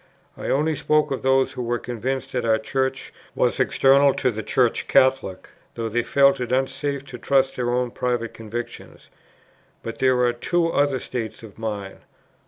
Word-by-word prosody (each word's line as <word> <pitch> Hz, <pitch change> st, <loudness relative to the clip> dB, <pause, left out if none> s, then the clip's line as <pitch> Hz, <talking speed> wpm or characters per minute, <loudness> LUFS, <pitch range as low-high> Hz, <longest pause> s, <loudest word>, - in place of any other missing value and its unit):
I -, -, -5 dB
only 155 Hz, +3 st, +1 dB
spoke 150 Hz, +1 st, +1 dB
of 135 Hz, -, -2 dB
those 135 Hz, 0 st, +2 dB
who -, -, -6 dB
were 120 Hz, 0 st, -1 dB
convinced 125 Hz, +3 st, -4 dB
that 125 Hz, -2 st, -2 dB
our 110 Hz, -1 st, +3 dB
Church 130 Hz, +4 st, -2 dB, 0.2 s
was -, -, +1 dB
external 135 Hz, +1 st, +4 dB
to 125 Hz, -, +1 dB
the 110 Hz, -1 st, -5 dB
Church 120 Hz, +1 st, +1 dB
Catholic, 130 Hz, -8 st, +2 dB, 0.3 s
though 115 Hz, -1 st, -3 dB
they 120 Hz, +2 st, +1 dB
felt 140 Hz, +2 st, +3 dB
it 125 Hz, -1 st, -4 dB
unsafe 135 Hz, +2 st, -1 dB
to 125 Hz, -3 st, -9 dB
trust 135 Hz, 0 st, +2 dB
their 120 Hz, -1 st, -1 dB
own 125 Hz, 0 st, 0 dB
private 120 Hz, -2 st, -2 dB
convictions; 115 Hz, +2 st, -8 dB, 0.7 s
but 115 Hz, -, -6 dB
there 130 Hz, -1 st, +3 dB
are 120 Hz, -, +2 dB
two 165 Hz, +7 st, 0 dB
other 145 Hz, -4 st, +1 dB
states 115 Hz, -3 st, -5 dB
of 110 Hz, -1 st, -13 dB
mind; 105 Hz, -3 st, -5 dB
1. -, -, -27 dB
125 Hz, 180 wpm, -23 LUFS, 115-135 Hz, 0.7 s, external